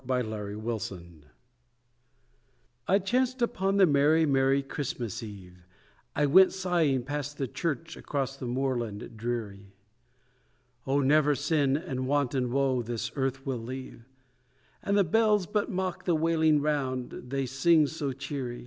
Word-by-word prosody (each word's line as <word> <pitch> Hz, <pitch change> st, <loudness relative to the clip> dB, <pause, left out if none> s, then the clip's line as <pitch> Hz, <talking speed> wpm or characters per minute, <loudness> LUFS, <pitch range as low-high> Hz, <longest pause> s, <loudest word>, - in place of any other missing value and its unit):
A 125 Hz, -1 st, +1 dB
CHRISTMAS 110 Hz, +1 st, -4 dB
CAROL 95 Hz, -3 st, -9 dB, 1.9 s
It 195 Hz, +1 st, +3 dB
chanced 255 Hz, +3 st, +1 dB
upon 195 Hz, -3 st, 0 dB
the 195 Hz, -, +7 dB
merry 150 Hz, +1 st, +4 dB
merry 135 Hz, -1 st, +2 dB
Christmas 125 Hz, -6 st, -4 dB
eve, 95 Hz, -5 st, -11 dB, 0.5 s
I 150 Hz, -, +2 dB
went 185 Hz, +7 st, +6 dB
sighing 170 Hz, -9 st, +1 dB
past 145 Hz, +1 st, -4 dB
the 135 Hz, -, -2 dB
church 165 Hz, +4 st, -3 dB
across 135 Hz, -2 st, -3 dB
the 135 Hz, -2 st, -6 dB
moorland 120 Hz, -4 st, -2 dB
dreary 105 Hz, -4 st, -5 dB, 1.1 s
'Oh! 140 Hz, +2 st, +2 dB
never 145 Hz, +1 st, +4 dB
sin 145 Hz, -2 st, +1 dB
and 130 Hz, -4 st, -4 dB
want 140 Hz, -2 st, +1 dB
and 125 Hz, -3 st, 0 dB
woe 135 Hz, -1 st, +1 dB
this 120 Hz, +1 st, -4 dB
earth 135 Hz, -1 st, -2 dB
will 130 Hz, -3 st, -2 dB
leave, 125 Hz, -1 st, -8 dB, 0.7 s
And 200 Hz, 0 st, +1 dB
the 200 Hz, -, +5 dB
bells 210 Hz, +2 st, +3 dB
but 210 Hz, +4 st, -1 dB
mock 185 Hz, -3 st, -3 dB
the 175 Hz, -, +2 dB
wailing 160 Hz, -1 st, +3 dB
round, 135 Hz, -4 st, -1 dB, 0.2 s
they 135 Hz, +1 st, -1 dB
sing 150 Hz, +5 st, +4 dB
so 145 Hz, -2 st, -3 dB
cheery. 130 Hz, -2 st, -5 dB
135 Hz, 140 wpm, -28 LUFS, 125-160 Hz, 1.9 s, the